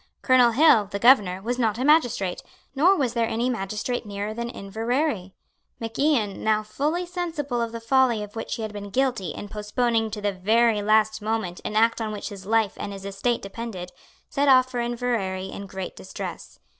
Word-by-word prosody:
Colonel 255 -2 +6
Hill, 235 -3 +5
the 200 +1 -5
Governor, 200 -5 +4
was 245 +3 -2
not 220 -3 +1
a 255 - -1
magistrate; 245 - +2 0.3
nor 335 +8 +4
was 260 -9 0
there 230 -2 +1
any 240 +3 0
magistrate 215 +3 -3
nearer 205 0 -4
than 235 +1 -4
Inverary. 225 - -2 0.4
Mac 225 -1 -6
Ian, 255 -9 +1
now 215 -1 +2
fully 300 +11 -2
sensible 325 -8 -3
of 230 -1 -2
the 230 - -5
folly 235 -2 +2
of 210 +1 -10
which 225 - -4
he 225 - -5
had 215 -1 -5
been 205 -1 -7
guilty 245 -4 0
in 205 - -6
postponing 225 +2 0
to 215 0 -5
the 205 -1 -1
very 215 +3 +2
last 215 +1 +2
moment 215 -5 -2
an 210 - -4
act 230 +1 +3
on 220 -1 -2
which 210 +1 -5
his 195 -2 -10
life 220 -2 +2
and 200 - -5
his 195 0 -9
estate 200 +5 -1
depended, 195 -3 -6 0.4
set 285 0 0
off 255 -1 +5
for 245 - -2
Inverary 235 -6 -2
in 200 - -7
great 190 -1 -6
distress. 95 - -8
225 Hz, 195 wpm, -25 LUFS, 205-245 Hz, 0.4 s, Colonel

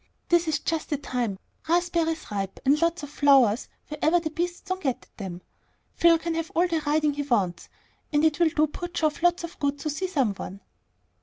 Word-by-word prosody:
This 345 -1 +3
is 310 -2 +2
just 320 0 -2
the 295 - 0
time, 245 -7 -2 0.3
raspberries 335 -3 0
ripe, 195 -2 -3
and 290 +4 +4
lots 335 -2 +1
of 290 - -7
flowers 270 -7 +4 0.2
wherever 310 +3 +2
the 320 -2 -4
beasts 350 +2 -3
don't 375 -1 -4
get 265 -6 +1
at - - -27
them. 180 -3 -7 0.5
Phil 335 -1 +5
can 335 0 -3
have 330 0 -3
all 345 +2 +4
the 330 -2 -1
riding 300 0 +2
he 290 - -3
wants, 200 -11 -1 0.4
and 295 0 +3
it'll 320 +2 +3
do 310 -1 +2
poor 330 +4 -6
Geoff 310 -3 -1
lots 350 0 +3
of 340 - -8
good 285 0 0
to 305 +1 -3
see 375 +6 -2
some 270 - +1
one." 195 0 -8
305 Hz, 205 wpm, -26 LUFS, 270-335 Hz, 0.5 s, Phil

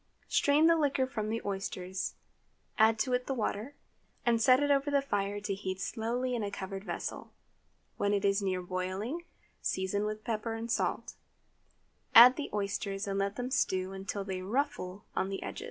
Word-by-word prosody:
Strain 295 +2 +4
the 335 0 +6
liquor 280 -4 +2
from 220 -5 -3
the 225 +1 -2
oysters, 190 -1 -3 0.6
add 220 +1 +6
to 230 +4 0
it 250 0 0
the 270 - -1
water, 230 +3 -2 0.5
and 235 -1 +3
set 255 +2 +6
it 290 0 +2
over 280 +1 +2
the 285 -1 +3
fire 205 -6 -1
to 205 -1 -2
heat 190 -1 -4
slowly 245 +4 -2
in 240 - -1
a 205 - -2
covered 195 -1 -6
vessel. - - -5 0.6
When 200 - +1
it 205 0 +1
is 195 +1 +3
near 185 -2 -1
boiling, 190 - -3 0.4
season 190 +2 -1
with 215 0 -4
pepper 225 0 -2
and 225 +1 -4
salt; - - -1 1.0
add 245 +3 +11
the 295 - -4
oysters, 200 0 -2
and 195 -1 -2
let 200 +1 -1
them 250 +2 -4
stew 190 -9 0
until 195 +1 -4
they 190 -1 -4
"ruffle" 200 -3 -2
on 190 - 0
the 195 - -4
edge. - - -5
210 Hz, 180 wpm, -31 LUFS, 195-250 Hz, 1.0 s, add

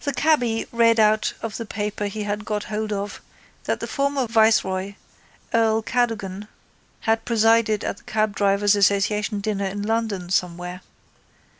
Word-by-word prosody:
The 285 - -1
cabby 245 -8 +2
read 230 -1 +4
out 215 0 +3
of 225 -2 -4
the 230 - -4
paper 205 0 -3
he 210 +1 -4
had 205 +1 -3
got 210 -1 -2
hold 215 0 -3
of 205 0 -4 0.4
that - - -1
the - - -2
former 280 -2 0
viceroy, 205 -4 +2 0.6
earl 225 -1 +2
Cadogan, 210 -5 -2 0.5
had 225 0 +1
presided 225 -2 +3
at - - -3
the - - -18
cabdrivers' 205 -1 +2
association 205 +1 +1
dinner 200 -1 -2
in 205 +2 -4
London 210 -5 -2
somewhere. 180 0 -2
215 Hz, 145 wpm, -23 LUFS, 200-225 Hz, 0.6 s, read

